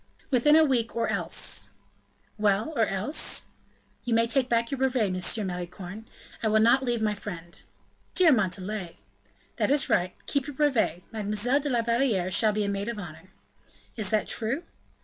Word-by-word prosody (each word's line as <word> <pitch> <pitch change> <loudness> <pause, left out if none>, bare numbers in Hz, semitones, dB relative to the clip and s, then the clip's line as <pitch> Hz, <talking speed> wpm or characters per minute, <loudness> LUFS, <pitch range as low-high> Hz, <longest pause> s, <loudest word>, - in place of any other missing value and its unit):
"Within 275 +4 +4
a 320 0 +6
week, 240 -5 0
or 230 0 0
else - - +1 0.3
" - - -41 0.3
"Well! 210 +7 +1
or 225 -4 +2
else?" 205 +10 +1 0.5
"You 240 -2 0
may 230 0 +3
take 255 +2 +1
back 230 +1 +1
your 275 - -3
brevet, 255 -7 +1
Monsieur 185 +4 0
Malicorne; 185 +3 -7 0.3
I 225 - 0
will 220 0 +3
not 235 +4 +4
leave 240 -3 -1
my 210 -1 +1
friend." 175 -5 -8 0.5
"Dear 360 -4 +6
Montalais!" 195 - -1 0.6
"That - - +1
is 285 0 +2
right. 180 +1 +1
Keep 280 -1 -1
your 290 - -7
brevet; 255 - +1
Mademoiselle 215 +5 0
de 290 0 -3
la 240 -3 +1
Valliere 230 -6 0
shall 215 +3 +5
be 210 0 -1
a - - -2
maid 200 +2 -3
of 235 - -5
honor." 175 -2 -10 0.7
"Is 215 -5 0
that 215 -1 0
true?" 240 +9 0
220 Hz, 175 wpm, -27 LUFS, 195-255 Hz, 0.7 s, a